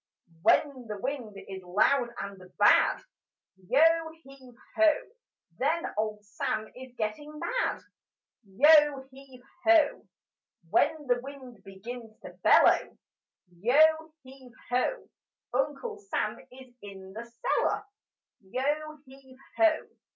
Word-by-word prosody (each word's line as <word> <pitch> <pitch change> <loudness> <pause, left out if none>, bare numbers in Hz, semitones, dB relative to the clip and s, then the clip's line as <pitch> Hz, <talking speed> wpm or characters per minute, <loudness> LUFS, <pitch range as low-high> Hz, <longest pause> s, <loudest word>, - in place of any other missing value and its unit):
When 260 - +2
the 210 -2 -6
wind 250 -5 -5
is 190 -1 -7
loud 235 +8 +2
and 195 -2 -9
bad, - - +4 0.7
Yo 280 +4 +5 0.4
heave 265 -2 -16 0.2
ho! 325 -1 +5 0.7
Then 335 +1 0
Old 210 0 -3
Sam 215 +1 -3
is 255 -1 -12
getting 235 +8 -4
mad: - - -2 0.6
Yo 285 +6 +4
heave 265 -2 -15 0.2
ho! 330 -3 +3 0.6
When 295 +6 +2
the 245 -2 +1
wind 260 -4 -11
begins 220 +3 -10
to - - -10
bellow, - - +4 0.6
Yo 245 - +2 0.4
heave 260 -2 -15 0.2
ho! 255 - -1 0.5
Uncle 295 - -2
Sam 405 -1 -3
is 255 -1 -14
in 190 -2 -11
the 225 +3 -7
cellar: 235 - -1 0.6
Yo 295 +9 -3
heave 265 0 -17 0.2
ho! 330 -2 +3
260 Hz, 110 wpm, -28 LUFS, 215-290 Hz, 0.7 s, Yo